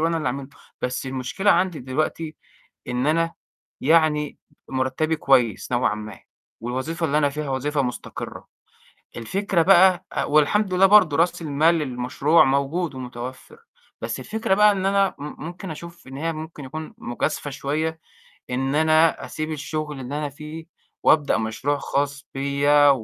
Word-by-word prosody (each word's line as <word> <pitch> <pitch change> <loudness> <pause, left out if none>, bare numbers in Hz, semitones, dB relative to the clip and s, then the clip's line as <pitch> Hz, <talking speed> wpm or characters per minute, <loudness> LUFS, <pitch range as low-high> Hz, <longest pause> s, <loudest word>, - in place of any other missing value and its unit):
وأنا 165 +1 +1
اللي 155 - -3
أعمله، 135 +1 -3 0.3
بس 125 +1 -2
المشكلة 130 +10 0
عندي 180 -2 +2
دلوقتي 155 +4 -2 0.5
إن 125 +3 -1
أنا 165 +2 +1 0.5
يعني 150 -1 +2 0.3
مُرتّبي 135 +5 0
كويس 125 -7 +2
نوعًا 120 -3 +2
ما، 105 -3 -8 0.4
والوظيفة 130 +8 -2
اللي 150 +1 +2
أنا 145 -2 +3
فيها 150 0 -4
وظيفة 140 +2 0
مستقرّة، 125 -2 -6 0.7
الفكرة 185 - 0
بقى 185 0 +5
آآ - - 0
والحمد 185 +7 +2
لله 190 +1 +5
برضه 190 -7 +6
راس 170 +1 +2
المال 155 +2 +3
للمشروع 140 +2 +2
موجود 140 +4 0
ومتوفّر، 130 - -8 0.4
بس - - -3
الفكرة 220 -3 -1
بقى 210 +1 +6
إن 190 -1 -2
أنا 195 -1 +2
م 150 +2 -7
ممكن 175 +1 -7
أشوف 170 -1 -10
إن 135 - -8
هي 165 +3 -2
ممكن 155 -1 -8
يكون 155 +4 -7
مجازفة 145 +5 -3
شوية 155 +4 -2 0.5
إن 135 +2 -1
أنا 155 +1 +3
أسيب 155 0 -4
الشُغل 150 -1 -4
اللي 135 +3 -4
أنا 150 - -2
فيه 155 +3 -9 0.4
وأبدأ 145 -7 +4
مشروع 115 +6 -1
خاص 140 0 -2
بيّا 140 +1 +4
150 Hz, 145 wpm, -23 LUFS, 135-165 Hz, 0.7 s, برضه